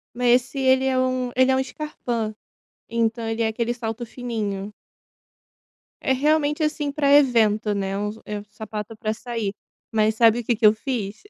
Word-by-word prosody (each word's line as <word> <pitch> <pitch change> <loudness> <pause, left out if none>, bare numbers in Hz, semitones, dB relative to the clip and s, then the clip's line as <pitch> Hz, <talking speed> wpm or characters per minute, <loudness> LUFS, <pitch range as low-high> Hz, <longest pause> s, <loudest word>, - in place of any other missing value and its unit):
Mas 245 0 +4
se 265 +2 -9
ele 265 0 +3
é 260 -1 +2
um 255 -1 0
ele 260 0 +5
é 260 - +3
um 265 - +2
scarpa, 245 -6 -4 0.5
então, 230 0 0
ele 225 +1 -1
é - - +2
aquele 230 +2 -1
salto 230 0 -4
fininho. 210 -5 -4 1.3
É, 265 - +1
realmente, 295 +3 +2
assim, 300 -2 -1
para 280 -1 +2
evento, 225 -7 +4
né, 195 -1 -2 0.3
é 210 0 -4
u - - -6
o - - -13
sapato 215 0 -7
para 215 0 -2
sair. 230 -3 -4 0.4
Mas 220 -1 +2
sabe 230 +1 +4
o - - -8
que 240 - +2
que 225 +1 -4
eu 210 - +8
fiz? 220 -3 -4
235 Hz, 180 wpm, -23 LUFS, 220-260 Hz, 1.3 s, eu